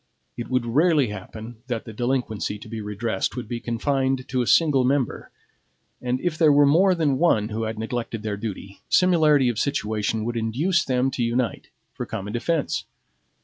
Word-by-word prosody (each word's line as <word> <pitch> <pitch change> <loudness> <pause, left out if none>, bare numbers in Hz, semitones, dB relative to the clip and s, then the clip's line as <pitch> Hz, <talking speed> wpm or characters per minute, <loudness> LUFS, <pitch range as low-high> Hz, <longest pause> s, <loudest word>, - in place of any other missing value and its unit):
It 120 - -6
would 130 -2 +1
rarely 145 +1 +3
happen 110 +2 -8
that 120 -3 -3
the 110 - -8
delinquency 120 -3 -2
to 110 - -12
be 110 0 -5
redressed 105 0 -2
would 125 -3 -5
be 120 0 -4
confined 130 +2 -1
to 130 -1 0
a 120 - -2
single 140 - +4
member, 130 -1 0 0.7
and 125 0 -1
if 175 -3 -2
there 155 -3 +6
were 145 0 +6
more 180 +6 +4
than 145 -6 +1
one 110 -11 +3
who 110 +1 -2
had 110 0 -4
neglected 115 0 -4
their 105 -2 -2
duty, 100 -2 -7
similarity 155 -7 +4
of 120 -3 0
situation 110 -4 -1
would 120 0 -2
induce 140 +11 +1
them 130 0 +1
to 125 -2 -2
unite 120 +1 -1 0.2
for - - -5
common 105 -1 -5
defense. 150 +6 -1
120 Hz, 180 wpm, -24 LUFS, 110-140 Hz, 0.7 s, there